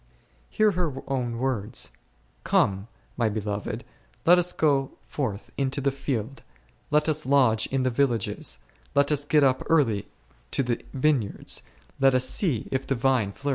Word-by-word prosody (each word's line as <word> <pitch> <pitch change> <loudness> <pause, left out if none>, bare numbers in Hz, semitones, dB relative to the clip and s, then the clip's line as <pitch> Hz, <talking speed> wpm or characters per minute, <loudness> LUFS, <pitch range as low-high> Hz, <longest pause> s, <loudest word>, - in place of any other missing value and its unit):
Hear 215 -1 +3
her 170 -8 -2
own 125 -4 -2
words: 120 -5 -2 0.5
Come, 95 +2 +1 0.3
my 115 -3 +2
beloved, 105 +2 -3 0.4
let 175 +2 +7
us 180 0 +1
go 140 -3 +1
forth 110 -9 -4
into 135 0 0
the 140 0 +1
field; 135 -2 -4 0.5
let 150 +1 +2
us 155 -1 0
lodge 130 -5 +3
in 135 -1 -1
the 130 - +1
villages; 120 -4 0 0.4
let 140 +1 +4
us 145 -1 +2
get 150 0 +3
up 130 -1 +3
early 120 -11 +2 0.4
to 135 - 0
the 120 -1 -2
vineyards, 130 -7 +1 0.4
let 135 -1 +5
us 130 0 +3
see 135 - +1
if 130 0 -2
the 135 - +1
vine 125 -4 +1
p - - -19
Prov. 145 - -1
135 Hz, 160 wpm, -26 LUFS, 115-145 Hz, 0.5 s, let